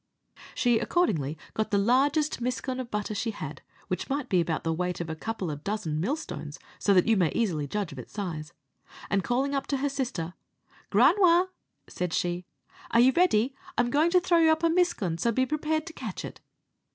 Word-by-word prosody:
She 240 -2 +3
accordingly 160 - 0 0.2
got 220 - -1
the 205 - +2
largest 275 +7 +2
miscaun 255 +1 -2
of 250 -2 -5
butter 210 -1 -2
she 225 +2 -2
had 155 -9 -6 0.3
which 185 - -3
might 275 -1 -2
be 180 -2 +3
about 165 -2 -2
the 165 - 0
weight 180 +1 -2
of 165 -2 -4
a - - -4
couple 190 -1 -4
a 145 - -4
dozen 160 -2 -3
mill 225 - 0
stones, 155 - -7 0.2
so 205 - +2
that 180 - +5
you 225 - +4
may 175 -6 +2
easily 165 -11 0
judge 200 +2 -3
of 140 - -8
its 125 - -10
size 165 -7 -5 0.6
and 195 -2 +2
calling 270 +3 0
up 275 -1 -1
to 280 - 0
her 285 +2 0
sister, 245 -12 -3 0.6
"Granua," 345 - +5 0.4
said 180 -1 -3
she, 175 0 -1 0.4
"are 230 - +3
you 250 +2 +7
ready? 270 -8 +3 0.2
I'm 240 0 +2
going 305 +5 +3
to 360 +1 +5
throw 350 -1 +3
you 320 -1 +6
up 315 +1 +1
a 335 - +4
miscaun, 270 - +1
so 235 - +2
be 260 +3 +2
prepared 305 +3 -1
to 330 - -8
catch - - -6
it." - - -9
225 Hz, 205 wpm, -28 LUFS, 175-285 Hz, 0.6 s, you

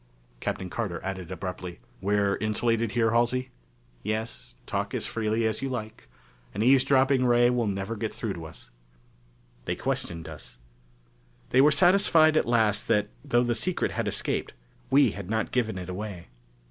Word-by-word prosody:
Captain 95 - -3
Carter 90 -3 -3
added 95 -3 -5
abruptly, 90 -2 -6 0.2
"We're 100 0 +2
insulated 115 +1 0
here, 115 -2 +2
Halsey?" 120 +2 +1 0.5
"Yes. 110 - -4
Talk - - -2
as - - -3
freely 110 0 -1
as 110 -1 0
you 135 - -2
like. 110 - -6 0.5
An 105 - 0
eavesdropping 130 +1 +4
ray 120 0 +4
will 120 -2 0
never 100 +3 -3
get 110 0 -3
through 110 -4 -4
to 85 -3 -8
us." 80 - -10 0.9
They - - -1
questioned 85 -2 -3
us. - - -9 0.9
They 130 - +6
were 145 - +7
satisfied 165 -1 +5
at - - +3
last 110 -3 +2
that, 105 - +2
though 120 +1 +2
the 120 -1 +1
secret 180 +9 -1
had - - -2
escaped, - - -2 0.4
we 135 -4 +5
had 100 -2 -8
not 110 0 -1
given 110 -6 0
it 90 -1 -6
away. 95 -1 -6
110 Hz, 160 wpm, -27 LUFS, 100-125 Hz, 0.9 s, were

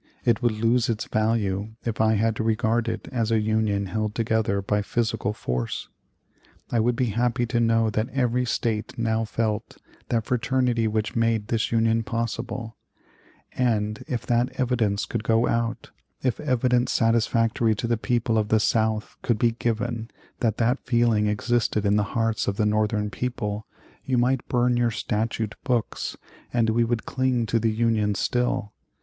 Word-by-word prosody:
It 115 -1 +3
would 120 -2 +2
lose 115 +3 +2
its 110 -2 -1
value 110 -2 0
if 115 -2 -1
I 110 0 +4
had 110 +1 +1
to - - -1
regard 115 +1 +1
it 115 -1 -5
as 115 -3 0
a 115 -1 +3
Union 105 -2 +1
held 105 +2 -2
together 110 -3 +1
by 105 +1 0
physical 110 0 -1
force. 60 - -3 0.8
I 120 - +2
would 120 +2 +2
be 120 -2 0
happy 120 +2 +1
to 120 0 0
know 115 -1 +3
that 110 +3 -1
every 125 -2 +1
State 110 -3 -2
now 115 -1 0
felt 110 -1 -2 0.3
that 115 -2 0
fraternity 125 -2 +1
which 110 0 -1
made 115 -2 +1
this 115 -1 0
Union 115 0 +2
possible; 115 0 -4 0.7
and, 110 -4 0
if 120 -3 -3
that 120 +1 +2
evidence 115 -5 +1
could 115 -2 -3
go 115 +1 +3
out, 115 0 -1 0.3
if 130 -2 0
evidence 125 -3 +1
satisfactory 115 -1 +2
to 110 - -3
the 115 0 +2
people 115 0 0
of 105 - 0
the 110 0 +3
South 110 0 0
could 120 - +1
be 115 +2 +3
given 115 0 -2 0.3
that 110 -3 0
that 120 +3 +2
feeling 115 -3 +2
existed 105 0 0
in 100 0 +3
the 105 - +3 0.2
hearts 115 -1 0
of 100 - -1
the 110 - +2
Northern 105 0 +1
people, 110 -3 -3 0.4
you 130 -2 0
might 125 +1 +1
burn 125 0 +2
your 120 -1 +2
statute 110 -1 -2
books 120 -4 -1 0.3
and 115 -2 +2
we 120 +1 +3
would 115 -1 -1
cling 130 -3 0
to 115 +1 +1
the 115 0 +1
Union 110 -2 +1
still. 120 -4 -1
115 Hz, 165 wpm, -25 LUFS, 110-120 Hz, 0.8 s, I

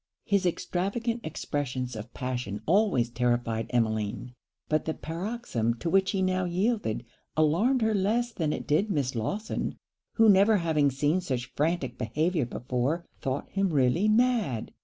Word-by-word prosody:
His 200 -2 +2
extravagant 220 +7 -2
expressions 135 - -3
of 110 +3 -7
passion 125 -5 -4
always 180 - +3
terrified 120 -2 0
Emmeline; 110 +1 -1 0.3
but 155 0 +1
the 160 - -2
paroxysm 165 - -2
to 165 +7 -3
which 190 0 +3
he 195 -1 0
now 185 0 +1
yielded, 180 - -1 0.3
alarmed 205 - +3
her 220 0 +2
less 220 +5 +1
than 160 -8 -1
it - - -4
did 175 +9 +2
Miss 140 -8 0
Lawson, 160 - -2 0.4
who 225 -1 +5
never 205 +2 +6
having 160 -5 +2
seen 145 +7 +1
such 130 -6 -3
frantic 145 -5 -1
behaviour 155 +4 0
before, 130 +8 -2 0.2
thought 135 +1 -2
him 195 -1 +1
really 150 +6 +2
mad. 220 - +2
160 Hz, 145 wpm, -28 LUFS, 125-200 Hz, 0.4 s, never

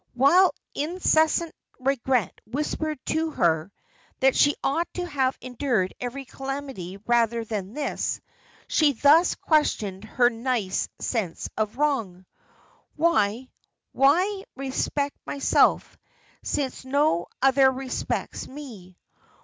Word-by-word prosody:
While 345 +9 +5 0.2
incessant 320 0 +1 0.3
regret 260 -2 0
whispered 300 +4 -2
to 320 +1 0
her 170 - +1 0.5
"that 265 -1 +4
she 290 0 +4
ought 330 +5 0
to 360 - -2
have 270 -5 0
endured 245 -7 -1
every 255 +2 -5
calamity 270 -9 -6
rather 235 -1 +2
than 210 -1 -5
this," 295 -1 -2 0.5
she 300 -3 +3
thus 290 +8 +5
questioned 215 - 0
her 240 +2 +2
nice 230 -5 -1
sense 210 -9 -3
of 215 +1 -2
wrong, 225 -12 -1 0.7
"Why, 255 -6 +1 0.4
why 365 +9 +3
respect 275 +1 -2
myself, 280 - +2 0.5
since 270 -3 -3
no 265 - +1
other 270 0 +5
respects 265 0 -4
me? 225 -11 -11
265 Hz, 105 wpm, -25 LUFS, 225-295 Hz, 0.7 s, While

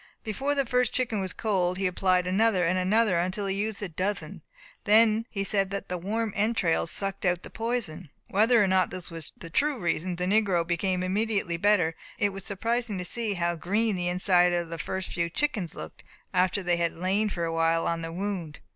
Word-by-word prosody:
Before 270 +6 -1
the 275 -1 +1
first 250 0 +1
chicken 240 -4 0
was 190 -1 -2
cold, 185 -5 0
he 195 - -1
applied 180 0 +2
another, 190 0 +2
and 175 +2 +2
another, 190 0 +2
until 185 +4 -1
he 195 0 -1
had 205 - +1
used 215 -2 -4
a - - -1
dozen. 185 +4 -3 0.9
He 195 -2 -2
said 195 -1 +1
that 200 0 -5
the 180 - -2
warm 215 +4 -2
entrails 200 -6 +1
sucked 195 +4 -2
out 180 -1 +1
the - - -10
poison. 215 - -3 0.2
Whether 220 +2 +4
or - - +3
not 185 -1 +2
this 180 -2 -5
was 165 -2 -7
the 165 - -10
true 295 - +1
reason, 175 -2 -1
the 180 +1 -2
negro 190 -4 +2
became 180 +2 0
immediately 200 -2 0
better; 200 -3 +3 0.3
and 205 - +1
it - - +3
was 195 -1 -7
surprising 230 +1 -1
to 180 - -3
see 220 +2 -2
how 175 -1 0
green 205 +6 0
the 175 -1 -2
inside 180 0 +3
of 175 -1 -1
the 165 0 -6
first 190 +3 -3
few 170 -1 -1
chickens 205 - -1
looked, - - -9 0.3
after 185 +1 +2
they 175 -1 +1
had 170 -1 0
lain 195 +5 0
for 175 - -4
a - - -2
little 165 - -3
while 165 0 +2
on 170 0 -1
the 165 0 -5
wound." 175 -4 -4
190 Hz, 215 wpm, -27 LUFS, 175-210 Hz, 0.9 s, Whether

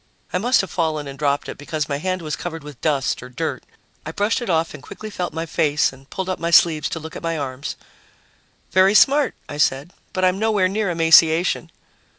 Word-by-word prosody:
I 180 - +1
must 245 +6 +3
have 195 - -7
fallen 155 -4 -1
and 135 0 -9
dropped 145 -1 0
it, - - -7
because 150 +1 -3
my 140 - -2
hand 185 +1 -2
was 155 -1 -3
covered 165 -3 -6
with 145 -4 -11
dust 145 -4 0
or 125 - -9
dirt. 125 - -4 0.4
I 155 - -5
brushed 205 +7 0
it 240 - -4
off 165 -1 +1
and 145 - -10
quickly 215 +11 -9
felt 180 -3 -3
my 165 +1 -4
face 150 -3 +1
and 135 +1 -17
pulled 190 -1 -4
up 185 - -2
my 170 - -1
sleeves 165 -2 +4
to 165 - -4
look 160 0 -9
at - - -6
my 165 -1 -2
arms. 140 0 -4 1.0
"Very 190 +2 +4
smart," 280 +4 +4
I 145 - -7
said, 145 +3 +1 0.2
"but 185 0 0
I'm 185 +1 +2
nowhere 215 -4 +2
near 200 +1 -1
emaciation." 165 0 +4
165 Hz, 215 wpm, -21 LUFS, 150-185 Hz, 1.0 s, sleeves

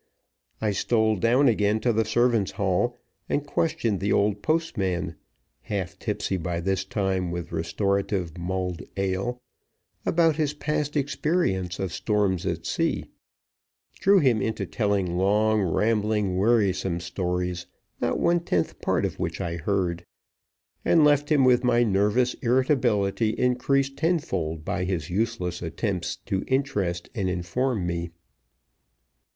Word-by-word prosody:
I 110 -1 0
stole 110 +2 +2
down 120 +8 +3
again 105 -2 +2
to 120 +1 +2
the 110 +1 +1
servants' 115 -2 +2
hall, 100 +5 0 0.3
and 145 - 0
questioned 145 - 0
the 100 +2 -1
old 105 0 +2
postman 95 - -1 0.5
(half 95 -5 -4
tipsy 95 - -2
by 85 0 -3
this 95 +2 0
time 95 -2 -1
with 85 0 -5
restorative 90 +1 -1
mulled 90 0 -3 0.2
ale) 95 +6 -1 0.6
about 165 -2 +3
his 150 -2 0
past 150 0 -1
experience 140 - 0
of 95 -4 -3
storms 100 -4 0
at - - -3
sea; - - 0 0.9
drew 200 +1 +4
him 130 - +3
into 110 +2 -2
telling 100 -6 0
long, 105 +3 +3
rambling, 105 +1 +1
wearisome 95 -4 +2
stories, 90 0 -3 0.3
not - - 0
one 175 0 +3
tenth 90 - -2
part - - +1
of - - -4
which - - -3
I 85 0 -3
heard; 85 -1 -1 0.8
and 165 - +4
left 145 +1 +3
him 140 -4 +5
with 125 0 +4
my 120 -1 +4
nervous 105 +4 +2
irritability 120 -5 +2
increased 135 +2 +1
tenfold 115 - -1
by 100 -1 -1
his 90 -4 -2
useless 90 -4 -1
attempts 90 +2 -2
to 95 -1 -1
interest 105 -11 -1
and 100 -6 -1
inform 95 +5 -1
me. 85 0 -2
100 Hz, 130 wpm, -25 LUFS, 90-125 Hz, 0.9 s, him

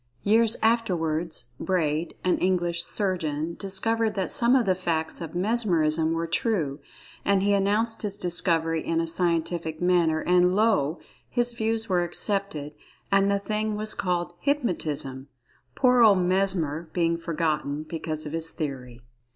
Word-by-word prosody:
Years 225 +2 +3
afterwards, 165 - 0
Braid, 165 -3 -1
an 185 - +1
English 175 -2 0
surgeon, 170 -6 -2
discovered 215 +3 0
that 190 -2 -2
some 235 +2 +5
of 250 -3 +3
the 190 - +3
facts 165 -3 -2
of 165 0 -7
"Mesmerism" 170 -6 +1
were 165 0 -1
true, 165 - -1 0.4
and 195 -1 +2
he 205 0 +2
announced 210 +3 +1
his 205 -2 -4
discovery 165 -3 0
in 165 0 -1
a 165 - 0
scientific 165 -1 -1
manner, 175 -3 +2
and 180 +1 +3
lo! 195 -8 +2 0.3
his 240 -1 +2
views 225 -1 -1
were 180 -2 +1
accepted, 175 -4 -2 0.4
and 195 0 +3
the 200 - +2
thing 215 +1 -2
was 215 +1 +2
called 175 -2 -2
"Hypnotism," 155 - -2 0.5
poor 250 -1 +4
old 210 -4 +6
Mesmer 180 -4 0
being 170 -1 +1
forgotten, 155 -3 -2
because 155 -1 -5
of 150 - -6
his 165 0 -1
theory. 130 -7 -6
175 Hz, 145 wpm, -25 LUFS, 160-205 Hz, 0.5 s, old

